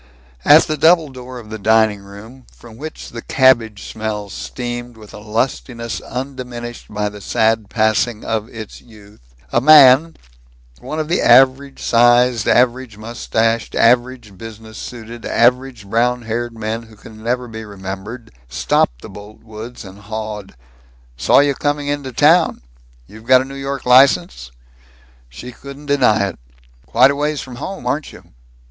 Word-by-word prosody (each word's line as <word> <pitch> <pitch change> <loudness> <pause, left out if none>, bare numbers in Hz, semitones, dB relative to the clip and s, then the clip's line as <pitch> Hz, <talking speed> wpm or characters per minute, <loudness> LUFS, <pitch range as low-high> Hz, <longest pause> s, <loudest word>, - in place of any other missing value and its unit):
At 150 +2 +7
the 155 - -3
double 160 0 +4
door 130 -1 -10
of 110 -3 -12
the 110 - -6
dining 110 0 +2
room, 105 +6 -14
from 115 -2 -15
which 155 +4 -8
the 115 - -8
cabbage 115 -7 +2
smell 105 -2 -5
steamed 120 +2 -6
with 105 -2 -14
a - - -9
lustiness 115 +2 -3
undiminished 125 -2 -7
by 105 0 -2
the 105 0 -9
sad 110 0 0
passing 110 +1 0
of 110 0 -3
its 110 -2 -10
youth, 105 - -19 0.2
a 120 - +3
man, 150 +2 +7 0.6
one 155 - -6
of 155 - -2
the 175 - 0
average 135 +1 +4
sized, 120 -1 +3
average 125 -2 +1
mustached, 115 0 -2
average 120 -2 +1
business 110 -1 -10
suited, 120 -1 -9
average 125 -1 +1
brown 120 +3 0
haired 115 +1 -4
men 110 +1 -3
who 110 -1 -16
can 110 +1 -14
never 125 +2 -2
be 110 -1 -8
remembered, 100 +3 -8 0.2
stopped - - 0
the - - -8
Boltwoods 110 +3 -11
and 95 +1 -12
hawed, 105 - -7 0.6
"Saw - - +3
you 145 0 +1
coming 145 +1 -2
into 145 -2 -3
town. 160 - +3 0.4
You've 110 - -15
got 130 0 +6
a - - -5
New 135 - -10
York 135 0 -5
license?" 130 - +4 0.8
She 65 - -10
couldn't 140 +3 -12
deny 125 -8 +2
it. 95 - -12 0.5
"Quite 130 - +4
a - - -3
ways 150 +1 -2
from 125 -2 -10
home, 190 +8 -7
aren't 150 +2 -2
you?" - - -17
120 Hz, 155 wpm, -18 LUFS, 110-130 Hz, 0.8 s, At